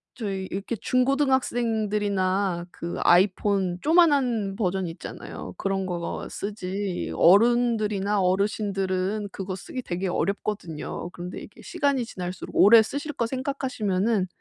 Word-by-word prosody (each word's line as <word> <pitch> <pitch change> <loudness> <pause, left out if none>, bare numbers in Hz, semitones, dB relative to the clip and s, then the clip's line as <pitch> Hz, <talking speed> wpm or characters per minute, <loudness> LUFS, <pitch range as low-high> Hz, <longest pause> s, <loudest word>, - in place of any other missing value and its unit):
저희 195 -5 -3
이렇게 200 +5 -3
중고등학생들이나 215 -8 +1
그 170 +1 -6
아이폰 190 0 +3
쪼만한 275 - +3
버전 190 -3 0
있잖아요. 165 - -8
그런 195 -1 -1
거 175 -2 -3
거 170 - -4
쓰지 200 -2 -4
어른들이나 210 -1 +3
어르신들은 195 +1 0
그거 190 -1 -5
쓰기 255 +7 -6
되게 185 -3 -3
어렵거든요. 175 -3 -3
그런데 180 +1 -7
이게 - - -13
시간이 280 -3 0
지날수록 185 -4 -7
오래 220 +3 +8
쓰실 285 +6 -5
거 240 -4 -1
생각하시면은 230 -7 -1
200 Hz, 315 characters per minute, -25 LUFS, 185-235 Hz, -, 오래